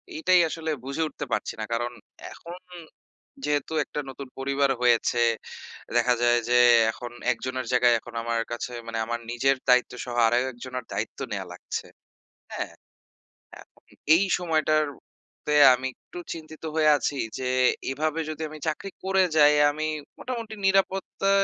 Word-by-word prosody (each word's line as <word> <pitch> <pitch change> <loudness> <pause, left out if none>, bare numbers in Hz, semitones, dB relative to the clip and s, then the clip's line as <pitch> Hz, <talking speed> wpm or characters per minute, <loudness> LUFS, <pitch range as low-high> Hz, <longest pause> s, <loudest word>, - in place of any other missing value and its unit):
এইটাই 185 - +4
আসলে 160 0 -4 0.2
বুঝে 140 +4 -2
উঠতে 145 0 -6
পারছি - - -1
না। - - -2
কারণ, 120 +1 -1 0.4
এখন 170 +1 -10 0.9
যেহেতু 145 +1 -1
একটা - - -5
নতুন 135 +1 -8
পরিবার 140 +1 +1
হয়েছে, 120 0 +3 0.8
দেখা 120 +1 +4
যায় 120 0 +4
যে 125 - +3 0.4
এখন 120 +2 -8 0.2
একজনের 130 +1 -4
জায়গায় 125 -1 +5
এখন - - -13
আমার 115 0 0
কাছে 120 +1 -4 0.2
মানে 115 - -4
আমার 120 +1 -3
নিজের 135 +3 +2
দায়িত্বসহ 125 0 +2
আরও 120 +2 +2 0.2
একজনের 125 0 -7
দায়িত্ব - - -4
নেয়া - - -3
লাগছে। - - -6 0.7
হ্যাঁ? - - -4 0.9
এখন - - -22 0.3
এই 185 - +4 0.2
সময়টার 155 -3 +2 0.6
তে 150 - +2 0.2
আমি 130 +1 -4
একটু 175 - -11
চিন্তিত 160 -1 -11
হয়ে 155 -1 +4
আছি 145 - -2 0.2
যে 130 - -2 0.4
এভাবে 155 +3 -1
যদি 155 0 -6
আমি 155 0 -10
চাকরি 155 +5 -2 0.2
করে 190 0 +3
যাই 150 0 +7 0.2
আমি 155 +1 -3 0.3
মোটামুটি 230 -4 -5
নিরাপত্তা 195 0 +1
140 Hz, 145 wpm, -26 LUFS, 125-160 Hz, 0.9 s, যাই